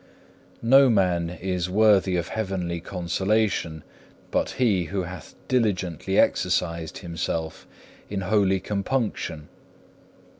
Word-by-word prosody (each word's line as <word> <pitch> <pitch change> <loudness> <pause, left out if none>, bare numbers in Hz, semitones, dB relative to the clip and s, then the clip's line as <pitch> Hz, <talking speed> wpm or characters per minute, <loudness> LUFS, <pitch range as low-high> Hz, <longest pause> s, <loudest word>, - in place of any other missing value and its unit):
5. - - -24
No 135 +3 +6
man 90 -6 +2
is 90 0 -3
worthy 100 -2 +4
of 85 -2 -2
heavenly 95 -5 -3
consolation 90 -1 -1 0.5
but - - +1
he 105 -9 +2
who 95 +3 -2
hath 90 -2 -9
diligently 95 -6 0
exercised 85 -2 +1
himself 85 -2 -4 0.4
in 100 -1 -3
holy 95 -1 +2
compunction. 100 - -2
95 Hz, 105 wpm, -25 LUFS, 85-105 Hz, 0.5 s, No